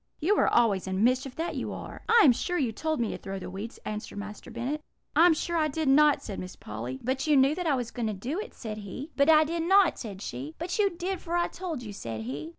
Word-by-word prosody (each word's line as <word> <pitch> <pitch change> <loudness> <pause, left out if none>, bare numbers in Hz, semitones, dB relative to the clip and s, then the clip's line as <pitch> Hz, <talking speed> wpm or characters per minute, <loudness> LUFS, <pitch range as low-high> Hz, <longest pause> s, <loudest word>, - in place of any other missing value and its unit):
You 380 +7 +3
are - - +4
always 205 -6 +3
in 190 +2 0
mischief, 255 +2 +1
that 330 +2 -3
you - - -3
are.' - - -8
"'I 460 0 +7
am 275 - +8
sure 355 +9 -1
you 255 -7 +1
told 315 +7 -2
me 230 - 0
to - - -6
throw 195 0 -5
the 185 - -7
weeds,' 205 +5 -6
answered 210 -1 -5
Master 205 +3 -7
Bennet. 250 +6 -3 0.3
"'I 325 +3 +7
am 345 - +6
sure 340 +2 -2
I 310 -1 +3
did 305 +1 -2
not,' 295 +1 +5
said 200 - -5
Miss 185 0 -7
Polly. 120 +5 -6
"'But 260 +4 -1
you 300 -2 +5
knew 270 +2 +5
that 355 +1 -3
I 290 - +3
was 245 -3 -3
going 235 -2 -2
to 215 - -1
do 250 - -4
it,' 445 +3 -7
said 215 -2 -6
he. 235 - -7
"'But 280 +2 +3
I 310 -1 +7
did 335 +2 -2
not,' 380 +1 +4
said 205 -4 -7
she. 135 +6 -6
"'But 355 +4 -3
you 405 -1 +4
did, 360 +1 -4
for 345 +1 -1
I 345 - +2
told 335 -8 -5
you,' 210 -3 -7
said 115 - -5
he. 140 +7 -5
265 Hz, 270 wpm, -28 LUFS, 205-325 Hz, 0.3 s, am